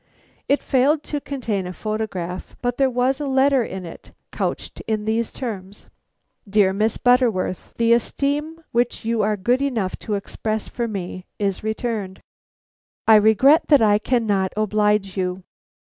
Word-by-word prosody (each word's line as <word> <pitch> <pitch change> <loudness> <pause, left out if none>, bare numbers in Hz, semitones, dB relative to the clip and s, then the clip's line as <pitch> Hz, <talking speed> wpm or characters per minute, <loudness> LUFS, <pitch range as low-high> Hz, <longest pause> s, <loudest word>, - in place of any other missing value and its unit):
It 285 - +2
failed 285 +4 +2
to 295 -1 -4
contain 225 -10 -3
a 180 - -6
photograph; 195 -4 -4
but 245 0 -1
there 270 -1 +3
was 255 +3 0
a 290 - -2
letter 270 -1 +3
in 190 -4 -6
it 165 - -11 0.2
couched - - -4
in 215 -1 -1
these 225 +1 0
terms: 205 -5 -7 0.6
"DEAR 195 -2 +3
MISS 215 +3 0
BUTTERWORTH: 245 -8 +1
"The 230 0 +4
esteem 290 +6 -1
which 240 -1 0
you 230 -1 +1
are 210 0 +1
good 245 +7 +1
enough 230 -9 -1
to 210 - -3
express 215 +2 -3
for 235 -1 -3
me 185 -3 -6
is 200 -2 -2
returned. 220 -3 -3 0.9
I 220 - +8
regret 220 - +5
that 285 -6 +5
I 205 -1 +4
cannot 210 -5 0
oblige 210 -2 +1
you. 185 0 -2
220 Hz, 150 wpm, -22 LUFS, 200-250 Hz, 0.9 s, I